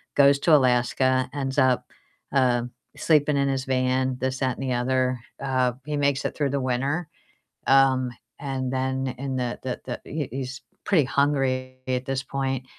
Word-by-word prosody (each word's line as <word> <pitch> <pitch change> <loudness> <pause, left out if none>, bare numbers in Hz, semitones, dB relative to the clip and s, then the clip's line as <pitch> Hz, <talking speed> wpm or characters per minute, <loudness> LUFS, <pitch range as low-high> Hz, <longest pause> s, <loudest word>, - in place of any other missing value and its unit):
goes 140 0 +5
to 155 +2 +5
Alaska, 130 0 +2
ends 135 -1 -3
up, 130 -2 +2 0.4
uh, 125 -3 +3 0.3
sleeping 150 -2 +3
in 140 0 +2
his 135 -1 -1
van, 130 0 +1
this, 130 0 -1
that, 130 -2 0
and - - -5
the 130 -1 -1
other, 130 0 +1 0.2
uh, 130 -2 +1
he 150 -1 -2
makes 140 -1 +1
it - - -2
through 145 -3 0
the 140 -1 -1
winter, 135 +6 -1 0.6
um, 130 -2 +4 0.3
and 130 -2 -3
then 130 0 -1
in 135 0 -3
the 125 -1 -2
the 130 -1 -3
the 125 - -5
he 150 -2 -4
he's 130 0 -5 0.2
pretty 170 -8 +3
hungry 130 -1 0
at 130 0 0
this 135 -1 -1
point, 135 -1 -2
130 Hz, 170 wpm, -25 LUFS, 130-140 Hz, 0.6 s, goes